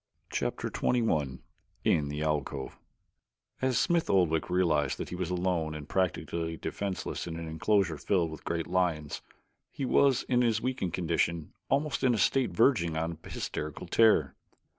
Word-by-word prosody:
Chapter - - -2
XXI 75 - 0 0.4
In 75 -2 +2
the 75 +1 -3
Alcove 75 -3 -2 0.8
As 130 -2 +2
Smith 170 +4 +2
Oldwick 85 -5 +2
realized 80 -6 +2
that - - -5
he - - -5
was 90 -1 -3
alone 90 -3 -1
and 75 -1 -7
practically 85 -3 -1
defenseless 95 -1 -4
in 80 -1 -5
an 85 -1 -5
enclosure 85 +1 +1
filled 85 -3 +1
with 80 - -9
great 85 -1 -2
lions 85 -5 -1 0.5
he 135 - -4
was, 135 -1 +4
in 125 -1 +2
his 115 -3 +2
weakened 125 -8 -2
condition, 85 -2 -1 0.2
almost 140 +1 0
in 125 -2 +4
a - - -1
state 130 +6 +2
verging 85 - +3
upon 80 0 -2
hysterical 75 -1 -4
terror. 115 -1 +4
85 Hz, 150 wpm, -30 LUFS, 80-110 Hz, 0.8 s, was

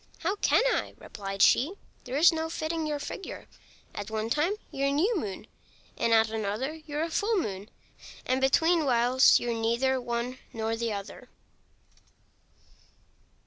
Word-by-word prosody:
"How 370 +5 0
can - - +3
I?" - - -3
replied 195 -2 -3
she; 300 +9 +4 0.3
"there's 285 +7 +4
no 320 0 -2
fitting 320 0 -3
your 300 -1 -1
figure. 330 +6 -7 0.5
At 205 +1 -6
one 220 +1 -3
time 300 +8 +2 0.2
you're 275 0 -1
a - - +1
New 365 +12 +2
Moon, 210 - -4 0.5
and 230 - 0
at 220 -1 +4
another 220 +6 -2
you're 300 +1 -2
a 330 - -4
Full 425 +6 +1
Moon; 205 - -3 0.6
and 260 +1 0
between 320 +5 +3
whiles 250 0 +5
you're 240 -1 -2
neither 235 +4 0
one 240 +1 -3
nor 225 -1 -2
the 230 0 -2
other." 200 -1 -7
255 Hz, 145 wpm, -28 LUFS, 225-315 Hz, 0.6 s, whiles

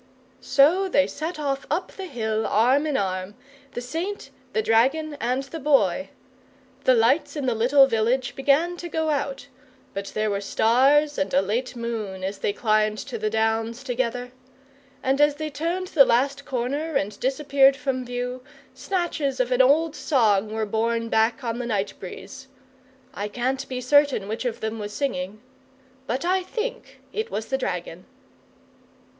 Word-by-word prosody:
So 350 +8 +3
they 285 -5 +4
set 315 +4 -5
off 275 -2 -2
up 345 +5 -1
the 385 -1 -7
hill 220 -6 -2
arm 260 +7 +3
in 295 - 0
arm, 185 +1 -2 0.4
the 245 - -4
Saint, 335 +11 -5 0.2
the 440 - 0
Dragon, 285 - +2
and 250 +3 0
the 320 +4 -8
Boy. 275 - +2 0.8
The 255 - +6
lights 270 +6 +2
in 290 -3 -3
the 250 - +2
little 260 +5 +5
village 245 +1 0
began 295 +6 +2
to 345 0 -6
go 315 -1 0
out; 280 -2 -2 0.5
but 200 0 -4
there 215 0 0
were 200 0 -1
stars, 275 +8 +3
and 190 0 -1
a 185 - +5
late 240 +6 -2
moon, 220 -5 -4
as 195 +1 -3
they - - 0
climbed 215 0 +1
to 235 0 -6
the 215 0 0
Downs 225 +2 -1
together. 250 -1 -2 0.7
And, 270 +2 +2
as 295 -1 +4
they 310 0 -4
turned 340 +5 -2
the 310 -8 +7
last 275 +3 +1
corner 275 +5 -2
and 205 -3 -1
disappeared 275 0 +3
from 265 -3 -2
view, 245 +1 -4 0.3
snatches 335 -8 -2
of 255 0 0
an 250 +1 +4
old 300 +4 +3
song 215 -7 +2
were 220 0 -1
borne 230 +2 -1
back 225 +4 +2
on 235 0 -2
the 245 - -3
night 205 -3 -1
breeze. 265 +8 -9 0.7
I 205 - -3
can't 260 +5 -2
be 255 -1 -3
certain 280 -5 +3
which 220 +4 -4
of 240 -2 -3
them 220 0 -3
was 210 0 -5
singing, 210 -7 -3 0.7
but 255 +7 -2
I 370 +1 +2
THINK 475 +6 -5
it 440 +1 -2
was 220 - -3
the 265 - +1
Dragon! - - -4
255 Hz, 165 wpm, -24 LUFS, 225-290 Hz, 0.8 s, the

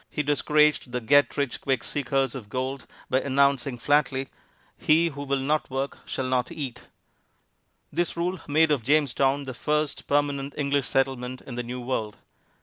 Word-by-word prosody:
he 150 - -2
discouraged 150 -2 +2
the 125 - 0
get 145 +6 +3
rich 140 -3 -1
quick 130 -3 0
seekers 135 -2 0
of 115 -6 -8
gold 130 +2 -3 0.2
by 130 - +1
announcing 140 -2 +2
flatly, 135 0 +1 0.5
"He 165 +2 +3
who 140 -2 -8
will 140 -1 0
not 150 +3 0
work 135 +1 -3
shall 130 - -2
not 130 +1 0
eat." 140 -7 -6 1.1
This 175 -1 -1
rule 180 +2 -1
made 155 +1 +4
of 145 -5 +2
Jamestown 140 +1 +2
the 130 -1 -6
first 150 +6 -1
permanent 140 -1 0
English 140 -2 0
settlement 130 -1 -1
in 130 - -9
the 120 - -2
New 125 +1 -6
World. 115 -4 -3
140 Hz, 160 wpm, -26 LUFS, 130-145 Hz, 1.1 s, made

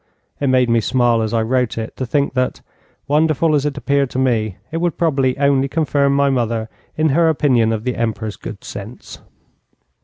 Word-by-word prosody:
It 140 - 0
made 130 -1 +3
me 115 0 +3
smile 120 0 +2
as 110 -1 -2
I 115 -1 +1
wrote 125 0 0
it 110 0 -5
to 130 - -3
think 140 +3 0
that, 130 -1 -1 0.5
wonderful 155 +2 +2
as 145 0 +2
it 145 -1 -4
appeared 140 -1 0
to - - -6
me, 115 -7 0
it 165 - -2
would 170 -1 -1
probably 135 -6 +1
only 140 -1 +2
confirm 140 -2 +1
my 140 0 +3
mother 115 -3 -1 0.3
in 155 0 +2
her 165 +3 +3
opinion 125 -7 +2
of 110 -1 -2
the 125 0 -2
Emperor's 110 -2 -3
good 100 - -9
sense. 105 +4 -9
130 Hz, 190 wpm, -18 LUFS, 115-145 Hz, 0.5 s, made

